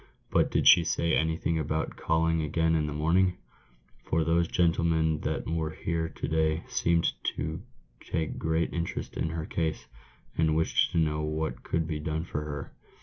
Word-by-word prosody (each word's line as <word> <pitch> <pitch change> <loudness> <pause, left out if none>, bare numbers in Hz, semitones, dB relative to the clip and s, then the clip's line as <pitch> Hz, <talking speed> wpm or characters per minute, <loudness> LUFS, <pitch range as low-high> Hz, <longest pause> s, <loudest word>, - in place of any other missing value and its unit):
"But - - +3
did - - +1
she 85 - +9
say 85 0 0
anything 80 +1 0
about 80 +1 -2
calling 80 0 +1
again 80 +2 +1
in 75 -2 +1
the - - -3
morning? 85 +5 +2 0.7
for 80 0 +1
those 85 +1 +2
gentlemen 80 -3 +2
that - - -2
were 80 -1 -1
here 80 +1 -2
to - - -5
day 80 +1 +1
seemed 85 0 +1 0.2
to 80 +2 -3 0.4
take 80 -1 -3
great 80 +1 0
interest 85 0 -4
in 80 - -1
her 80 0 -4
case, 80 -2 -2 0.5
and 80 -1 +2
wished 80 0 +2
to - - 0
know 75 -2 +1
what 75 -4 -2
could 80 -1 -1
be 75 -1 -3
done 80 +1 -2
for 75 -3 -4
her." 75 -2 -6
80 Hz, 170 wpm, -28 LUFS, -, 0.7 s, she